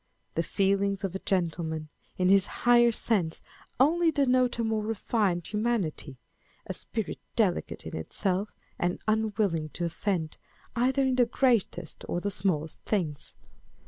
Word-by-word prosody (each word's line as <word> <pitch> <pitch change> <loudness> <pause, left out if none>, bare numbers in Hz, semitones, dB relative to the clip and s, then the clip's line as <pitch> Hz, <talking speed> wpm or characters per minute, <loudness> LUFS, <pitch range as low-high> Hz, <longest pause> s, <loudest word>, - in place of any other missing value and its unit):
The 165 - +1
feelings 195 +3 +1
of 190 -2 -2
a 190 - -3
gentleman, 165 -5 -1 0.3
in 185 0 +2
this 195 0 +5 0.2
higher 240 -1 +6
sense, 195 -8 0 0.4
only 330 +5 +4
denote 255 -4 +2
a 230 - 0
more 220 -1 0
refined 210 -4 0
humanity 210 - -1
â€" - - -17 0.5
a - - -4
spirit - - -4 0.2
delicate - - 0
in - - -6
itself, 190 - -1 0.3
and 175 0 0
unwilling 205 -7 +1
to 175 - -2
offend, 170 -1 -2 0.4
either 260 +3 +2
in 260 -1 +1
the 245 -2 +5
greatest 245 -4 0
or 175 - 0
the 200 +3 -2
smallest 170 -5 -1
things. 165 -9 -2
200 Hz, 145 wpm, -28 LUFS, 175-235 Hz, 0.5 s, higher